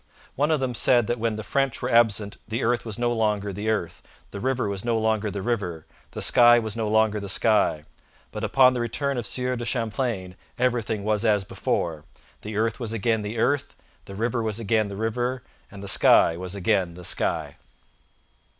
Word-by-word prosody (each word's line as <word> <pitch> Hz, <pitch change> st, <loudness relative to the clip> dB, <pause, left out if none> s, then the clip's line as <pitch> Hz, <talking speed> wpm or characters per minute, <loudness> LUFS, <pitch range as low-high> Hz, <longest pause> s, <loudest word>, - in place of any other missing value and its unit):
One 145 Hz, +3 st, +1 dB
of 155 Hz, -2 st, +2 dB
them 130 Hz, -2 st, -2 dB
said 120 Hz, 0 st, +3 dB
that 120 Hz, +2 st, -2 dB
when 115 Hz, -1 st, -1 dB
the 110 Hz, -, -6 dB
French 135 Hz, +1 st, -1 dB
were 125 Hz, -, -3 dB
absent 110 Hz, -3 st, +2 dB
the 115 Hz, +1 st, -3 dB
earth 120 Hz, +1 st, 0 dB
was 110 Hz, -1 st, -5 dB
no 120 Hz, 0 st, 0 dB
longer 105 Hz, -3 st, 0 dB
the 105 Hz, +3 st, -3 dB
earth, 85 Hz, -6 st, -2 dB, 0.3 s
the 100 Hz, -, -6 dB
river 130 Hz, 0 st, -1 dB
was 100 Hz, -1 st, -3 dB
no 120 Hz, -1 st, 0 dB
longer 110 Hz, -1 st, 0 dB
the 100 Hz, -1 st, -5 dB
river, 100 Hz, -9 st, -2 dB, 0.2 s
the -, -, -4 dB
sky 120 Hz, 0 st, +6 dB
was 110 Hz, -2 st, -2 dB
no 115 Hz, -2 st, -2 dB
longer 110 Hz, 0 st, +2 dB
the 100 Hz, -1 st, -5 dB
sky; 100 Hz, -7 st, +2 dB, 0.5 s
but -, -, -6 dB
upon 130 Hz, -1 st, +5 dB
the 125 Hz, -, -2 dB
return 130 Hz, +3 st, -1 dB
of 120 Hz, -, -4 dB
Sieur 125 Hz, 0 st, -1 dB
de 120 Hz, -, -5 dB
Champlain 115 Hz, -5 st, -2 dB, 0.2 s
everything 115 Hz, -4 st, 0 dB
was 105 Hz, 0 st, 0 dB
as 105 Hz, -3 st, +2 dB
before: 80 Hz, -4 st, -2 dB, 0.4 s
the 105 Hz, 0 st, -6 dB
earth 110 Hz, +2 st, 0 dB
was 115 Hz, -3 st, -3 dB
again 110 Hz, 0 st, 0 dB
the 105 Hz, +3 st, -5 dB
earth, 140 Hz, +5 st, 0 dB, 0.3 s
the 100 Hz, -, -9 dB
river 115 Hz, +3 st, -1 dB
was 110 Hz, -1 st, -2 dB
again 110 Hz, -1 st, +1 dB
the 100 Hz, -, -7 dB
river, 120 Hz, +4 st, -2 dB, 0.3 s
and 100 Hz, 0 st, -11 dB
the -, -, -7 dB
sky 90 Hz, -3 st, +5 dB
was 90 Hz, +2 st, -6 dB
again 95 Hz, -3 st, 0 dB
the 90 Hz, 0 st, -8 dB
sky.' -, -, -1 dB
110 Hz, 200 wpm, -25 LUFS, 100-120 Hz, 0.5 s, sky